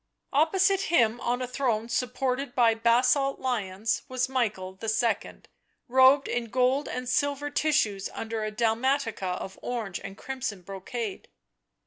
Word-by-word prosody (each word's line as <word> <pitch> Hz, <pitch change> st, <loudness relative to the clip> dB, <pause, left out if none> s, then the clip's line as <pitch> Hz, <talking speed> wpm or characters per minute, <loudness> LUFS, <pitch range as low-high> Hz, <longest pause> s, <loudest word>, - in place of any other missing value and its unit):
Opposite 380 Hz, +6 st, +3 dB
him 240 Hz, -7 st, +3 dB
on 245 Hz, +1 st, -1 dB
a -, -, -3 dB
throne 240 Hz, -4 st, -1 dB
supported 250 Hz, +2 st, -2 dB
by 235 Hz, -3 st, +5 dB
basalt 250 Hz, +4 st, +3 dB
lions 220 Hz, -4 st, -1 dB
was 255 Hz, -1 st, -1 dB
Michael 210 Hz, -8 st, -2 dB
II., 225 Hz, 0 st, -1 dB, 0.5 s
robed 260 Hz, +2 st, +5 dB
in 240 Hz, -1 st, -1 dB
gold 255 Hz, +4 st, +1 dB
and 250 Hz, 0 st, -4 dB
silver 285 Hz, +2 st, 0 dB
tissues 250 Hz, -11 st, +1 dB
under 225 Hz, -1 st, -4 dB
a 215 Hz, -, -1 dB
dalmatica 225 Hz, -3 st, 0 dB
of 190 Hz, -, -8 dB
orange 225 Hz, -7 st, -3 dB
and 195 Hz, -, -8 dB
crimson 245 Hz, -8 st, -5 dB
brocade. 200 Hz, -, -6 dB
245 Hz, 130 wpm, -27 LUFS, 220-265 Hz, 0.5 s, by